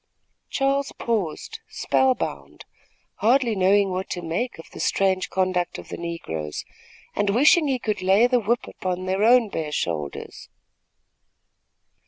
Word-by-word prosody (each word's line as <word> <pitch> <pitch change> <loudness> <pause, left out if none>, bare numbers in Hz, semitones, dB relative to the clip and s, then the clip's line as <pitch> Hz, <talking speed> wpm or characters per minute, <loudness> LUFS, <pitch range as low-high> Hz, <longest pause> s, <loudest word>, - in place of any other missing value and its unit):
Charles 275 0 0
paused, 225 - -2
spell 260 -1 +2
bound, - - -6 0.5
hardly 235 0 +3
knowing 195 +1 +3
what 185 +1 -3
to 175 - -4
make 175 +10 -2
of 165 - -11
the - - -10
strange 190 -1 +1
conduct 185 -2 0
of - - -11
the - - -5
negroes, 80 - -5 0.5
and 205 0 +1
wishing 295 +8 +5
he 265 -2 +1
could 215 -5 -3
lay 195 +5 +5
the 245 0 +3
whip 235 +2 0
about 185 0 -4
their 190 +2 0
own 240 0 +6
bare 155 -5 -4
shoulders. 75 - -4
195 Hz, 140 wpm, -24 LUFS, 180-245 Hz, 0.5 s, own